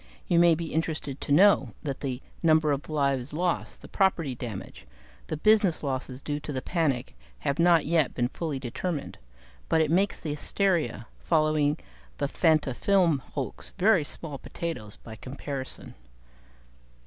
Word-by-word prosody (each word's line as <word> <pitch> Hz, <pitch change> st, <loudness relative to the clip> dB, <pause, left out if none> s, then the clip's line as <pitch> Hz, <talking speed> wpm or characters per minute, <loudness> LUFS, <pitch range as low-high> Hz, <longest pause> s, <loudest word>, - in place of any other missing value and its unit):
You 170 Hz, -, +4 dB
may 170 Hz, -1 st, +6 dB
be 165 Hz, 0 st, -5 dB
interested 155 Hz, -4 st, -2 dB
to -, -, -4 dB
know 155 Hz, -, +5 dB
that 140 Hz, -3 st, -3 dB
the 130 Hz, -2 st, -4 dB, 0.2 s
number 155 Hz, -2 st, +4 dB
of 140 Hz, +2 st, -2 dB
lives 140 Hz, -3 st, 0 dB
lost, 175 Hz, +2 st, -2 dB
the -, -, -9 dB
property 170 Hz, -8 st, +1 dB
damage, 115 Hz, -, -7 dB, 0.4 s
the 155 Hz, -, -3 dB
business 205 Hz, -1 st, +3 dB
losses 130 Hz, -1 st, -3 dB
due 145 Hz, 0 st, -2 dB
to 150 Hz, -, -6 dB
the 130 Hz, -, -2 dB
panic, 140 Hz, -, -1 dB, 0.2 s
have 140 Hz, -, -2 dB
not 170 Hz, -2 st, +5 dB
yet 160 Hz, -3 st, +2 dB
been 120 Hz, -1 st, +1 dB
fully 155 Hz, -1 st, -3 dB
determined; 140 Hz, +5 st, -4 dB, 0.5 s
but 160 Hz, -, +3 dB
it 155 Hz, -1 st, +2 dB
makes 195 Hz, +4 st, +2 dB
the 155 Hz, -, -4 dB
hysteria 150 Hz, -, 0 dB
following 155 Hz, -2 st, +2 dB, 0.4 s
the 140 Hz, -, 0 dB
Fantafilm 160 Hz, +2 st, +2 dB
hoax 135 Hz, +1 st, -6 dB
very 195 Hz, -4 st, +4 dB
small 145 Hz, -1 st, -7 dB
potatoes 145 Hz, -13 st, -5 dB
by 110 Hz, -, -10 dB
comparison. 130 Hz, +2 st, -5 dB
150 Hz, 150 wpm, -27 LUFS, 135-170 Hz, 0.5 s, may